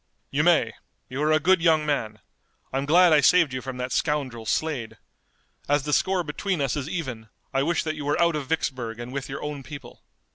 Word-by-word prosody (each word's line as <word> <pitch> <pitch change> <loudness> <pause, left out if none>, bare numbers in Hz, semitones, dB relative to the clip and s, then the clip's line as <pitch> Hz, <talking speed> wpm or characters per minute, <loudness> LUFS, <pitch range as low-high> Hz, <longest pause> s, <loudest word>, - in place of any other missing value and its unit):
"You - - +1
may. - - +3 0.4
You 130 +3 -4
are 155 +1 +2
a 155 - +4
good 185 +3 +3
young 160 -2 +3
man. 110 -8 -2 0.5
I'm 135 +1 -1
glad 175 +2 +6
I 150 - +6
saved 165 -1 +4
you 130 - -3
from 130 -1 -6
that 125 0 -4
scoundrel, 130 -7 -1
Slade. 135 -5 -2 0.7
As 145 -1 +2
the 150 +1 -2
score 185 +2 +2
between 170 +4 -2
us 135 -3 0
is 145 0 -4
even 125 -11 -5 0.2
I 135 - +2
wish 165 +4 +1
that 155 - -2
you 155 -2 -6
were 145 - 0
out 170 -1 +3
of 145 -3 -4
Vicksburg 130 -7 -2
and 120 +2 -7
with 135 -1 -4
your 135 - -5
own 150 -1 -4
people." 145 +1 -11
145 Hz, 215 wpm, -25 LUFS, 130-160 Hz, 0.7 s, glad